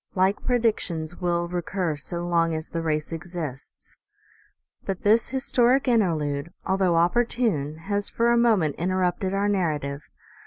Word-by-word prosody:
Like 190 +2 +2
predictions 210 -9 0
will 175 -1 0
recur 175 -1 -2
so 170 +4 -4
long 165 -1 +2
as 155 0 -5
the 165 - -3
race 155 -1 -1
exists. 165 -5 -7 0.9
But 190 -2 -4
this 220 +3 +3
historic 265 0 +2
interlude, 165 - +1
although 190 -2 +2
opportune, 175 - +1
has 200 0 -1
for 235 +1 +2
a - - +4
moment 215 -11 +2
interrupted 185 +2 0
our 200 +1 +1
narrative. 150 -8 -1
180 Hz, 130 wpm, -25 LUFS, 160-205 Hz, 0.9 s, a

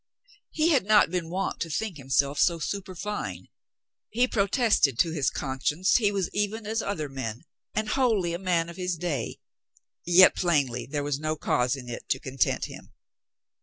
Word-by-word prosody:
He 320 +1 +1
had 285 - +3
not 210 -4 +4
been 175 -3 -2
wont 190 +3 -2
to 165 - -3
think 190 +2 -3
himself 140 +1 0
so 170 +1 +3
superfine. 185 - -5 0.6
He 245 +3 +2
pro 200 -5 +1
tested 200 - +2
to 165 - +2
his 145 -4 +1
conscience 145 +6 0
he 210 -4 +2
was 195 -3 -1
even 210 +2 -2
as 220 +2 -1
other 160 -7 -3
men 130 -3 -6 0.3
and 215 0 0
wholly 215 -8 +1
a 170 - -3
man 175 -3 0
of 170 +1 -10
his 180 -2 -2
day, 155 -8 -3 0.7
yet 180 +2 +7
plainly 140 -9 0
there 145 0 -3
was 145 -1 -2
no 155 +1 -1
cause 125 -3 0
in 130 -3 -9
it 120 - -7
to 130 - +1
content 130 0 -1
him. - - -12
170 Hz, 175 wpm, -27 LUFS, 140-205 Hz, 0.7 s, yet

